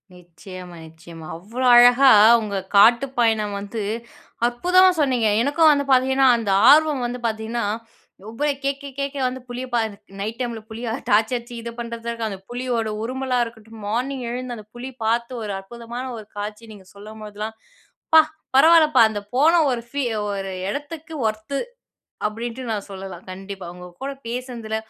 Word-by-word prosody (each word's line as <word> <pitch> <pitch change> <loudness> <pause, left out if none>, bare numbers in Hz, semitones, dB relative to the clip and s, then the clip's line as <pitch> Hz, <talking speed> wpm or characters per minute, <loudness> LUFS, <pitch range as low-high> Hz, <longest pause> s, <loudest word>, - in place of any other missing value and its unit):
நிச்சயமா, 180 +1 -11
நிச்சயமா, 165 0 -12
அவ்வளோ 225 +9 -4
அழகா 245 +3 +7 0.3
உங்க 205 -2 -3 0.2
காட்டுப் 235 +6 +5
பயணம் 220 -3 +1
வந்து, 205 +2 -5 0.7
அற்புதமா 360 +10 +4
சொன்னீங்க. 255 -6 +2
எனக்கும் 300 +5 +4
வந்து 285 -1 +1
பாத்தீங்கன்னா, 265 +1 +4
அந்த 220 -4 -2 0.2
ஆர்வம் 300 -2 +5
வந்து 245 +1 -4
பாத்தீங்கன்னா, 225 +1 -2 0.6
ஒவ்வ 230 +6 -5 0.2
கேட்க 275 +1 -2
கேட்க 280 0 -3
வந்து 255 +1 -5
புலிய 245 +1 -5
பா 240 - +3 0.4
நைட் 215 +3 -4
டைமில 235 -3 -3
புலியா, 225 +1 -5 0.2
டார்ச்சு 220 +4 +3
அடிச்சு 240 0 -10
இது 235 0 -6
பண்ணுறது 235 0 -6
இருக்கு, 230 -1 -3
அந்த 195 -2 -7
புலியோட 245 -3 -2
உருமலா 255 +1 -1
இருக்கட்டும், 225 -1 -12
மார்னிங் 255 +4 -2
எழுந்து 250 0 -4
அந்த 215 - -11
புலி 245 +2 -6 0.2
பார்த்து 235 +2 0
ஒரு 205 -2 -4
அற்புதமான 235 +5 -8
ஒரு 215 - -9
காட்சி 210 +2 -6
நீங்க 200 -3 -13
சொல்லும்போதெல்லாம், 215 +1 -8 0.6
"பா! 320 - +11 0.4
பரவாயில்லப்பா 310 -3 +6
அந்த 210 -1 -4 0.2
போன 300 +6 +5 0.2
ஒரு 240 -2 -2
ஃபீ 280 +2 -2 0.3
ஒரு 195 -1 -4 0.2
எடத்துக்கு 295 +6 -6
ஒர்த்து" 215 +6 -3 0.7
அப்படின்ட்டு 235 +3 -5
நான் 205 -1 -4
சொல்லலாம் 190 -2 -8
கண்டிப்பா, 195 0 -8
உங்க 180 0 -10 0.2
கூட 275 - -2 0.2
பேசினதுல, 235 -3 -4
235 Hz, 150 wpm, -22 LUFS, 210-260 Hz, 0.7 s, பா